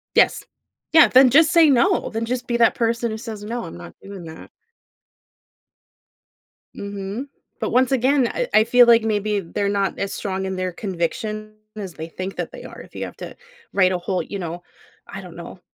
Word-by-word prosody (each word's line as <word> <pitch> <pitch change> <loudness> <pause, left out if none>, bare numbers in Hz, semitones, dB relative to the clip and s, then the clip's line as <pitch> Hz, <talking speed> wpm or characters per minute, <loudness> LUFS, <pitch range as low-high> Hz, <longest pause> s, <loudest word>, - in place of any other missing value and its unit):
Yes. - - +3 0.5
Yeah, 320 - +8
then 260 0 +7
just 310 +5 +5
say 335 -3 +6
no, 345 +9 +2
then 225 +1 -3
just 250 +1 -3
be 240 - 0
that 230 - +4
person 230 0 0
who 220 - -5
says, 220 -2 -7
"No, 235 +3 -4
I'm - - -9
not 85 -1 -11
doing 195 -3 -10
that." 160 0 -11 2.3
Mhm. 200 +6 -6 0.3
But - - -1
once 255 +1 +2
again, 265 0 +3
I - - -3
I 215 - +5
feel 245 +1 +6
like 235 -1 +6
maybe 210 -1 0
they're 200 +3 -3
not 200 -1 -1
as 200 0 -3
strong 190 -1 -3
in 190 0 -3
their 185 -1 -2
conviction 215 +4 -4 0.2
as 195 -5 -6
they 160 +1 -7
think 185 +3 -6
that - - -4
they - - -10
are. - - -10
If - - -14
you - - -4
have - - -9
to - - -8 0.4
write 185 -2 +3
a 180 - -1
whole 180 0 -2
you 200 - -7
know, 175 -1 -6 0.4
I 195 - -8
don't 180 -3 -12
know 175 +1 -10
210 Hz, 200 wpm, -22 LUFS, 190-240 Hz, 2.3 s, Yeah